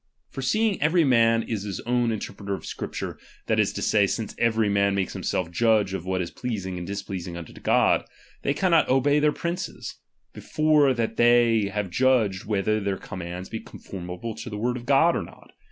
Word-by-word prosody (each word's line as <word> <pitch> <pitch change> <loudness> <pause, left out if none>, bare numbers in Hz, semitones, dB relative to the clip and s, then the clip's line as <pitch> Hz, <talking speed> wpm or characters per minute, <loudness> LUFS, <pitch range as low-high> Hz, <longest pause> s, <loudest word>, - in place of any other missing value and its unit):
For 135 - -6
seeing 215 - +1
every 165 +3 +4
man 115 -4 +4
is 110 -3 -3
his 100 -1 -5
own 120 -1 +1
inter 110 - -4
preter 100 -1 -4
of - - -10
Scripture, - - -5 0.3
that - - +1
is - - +2
to - - -4
say, 105 -2 +3
since 110 +1 -3
every 115 -2 +2
man 100 0 +2
makes 95 -1 -1
himself 85 -2 -2
judge 110 0 +2
of 95 -2 -4
what 95 -1 0
is 85 - -7
pleasing 100 -7 -4
and 85 - -6
dis 100 0 -4
pleasing 90 -3 -6
unto 85 -2 -9
God; - - +2 0.4
they 140 - 0
cannot 175 -3 +3
obey 145 +3 +3
their 150 0 +3
princes, 170 +4 -5 0.4
before 150 -3 +2
that 115 -2 -2
they 120 -2 +4
have 100 -2 -3
judged 115 -5 +2
whether 105 +1 0
their 100 -2 -2
com 95 - -8
mands 90 +2 -6
be 110 - -5
conformable 95 +5 -7
to - - -7
the 105 - -5
word 120 +3 -1
of 120 -1 -8
God, 145 +5 +4
or - - -1
not. - - -13
110 Hz, 200 wpm, -25 LUFS, 95-130 Hz, 0.4 s, every